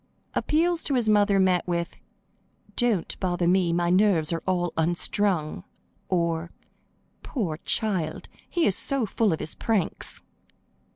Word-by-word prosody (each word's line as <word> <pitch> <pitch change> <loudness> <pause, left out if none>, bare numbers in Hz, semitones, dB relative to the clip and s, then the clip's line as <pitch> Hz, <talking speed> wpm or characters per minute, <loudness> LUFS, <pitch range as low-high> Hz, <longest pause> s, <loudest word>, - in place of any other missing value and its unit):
Appeals 335 +2 +1
to 280 - +2
his 240 -3 +1
mother 205 -2 +4
met 185 -2 +2
with: 170 -1 -2 0.8
"Don't 230 -8 +1
bother 175 -2 0
me, 180 -1 +3
my 175 0 +1
nerves 180 -5 +3
are 165 - -2
all 175 -2 0
unstrung;" 175 +1 0 0.5
or, 170 -2 0 0.7
"Poor 185 - -3
child, 195 -8 -1 0.2
he 345 -2 +1
is 190 - +4
so 275 +1 +1
full 215 0 +1
of 160 - -1
his - - -5
pranks!" 220 -7 -2
185 Hz, 130 wpm, -26 LUFS, 170-215 Hz, 0.8 s, mother